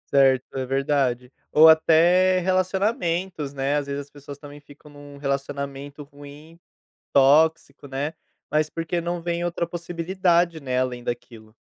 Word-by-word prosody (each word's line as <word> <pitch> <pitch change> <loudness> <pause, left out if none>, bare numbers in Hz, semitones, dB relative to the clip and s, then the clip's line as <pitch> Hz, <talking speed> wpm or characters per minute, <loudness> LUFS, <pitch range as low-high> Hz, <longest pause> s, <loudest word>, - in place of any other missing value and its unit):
Certo. 135 -1 +3
É - - -2
verdade. 135 -2 -1 0.2
Ou 160 +1 +7
até 170 +4 +5
relacionamentos, 185 -4 -1
né, 140 +1 -1
às 140 -1 -3
vezes 140 0 -4
as 140 - -15
pessoas 145 -1 -11
também 145 0 -12
ficam 145 +1 -17
num 145 0 -13
relacionamento 140 +1 -5
ruim, 145 +3 -14 0.5
tóxico, 145 +1 +3
né, 140 +4 -4 0.4
mas 155 0 +1
porque 165 +2 -3
não 170 0 -4
vem 170 0 -2
outra 170 0 -2
possibilidade, 170 0 -1
né, 130 -2 -2
além 125 -1 -2
daquilo. 115 -3 -7
145 Hz, 140 wpm, -23 LUFS, 140-170 Hz, 0.5 s, Ou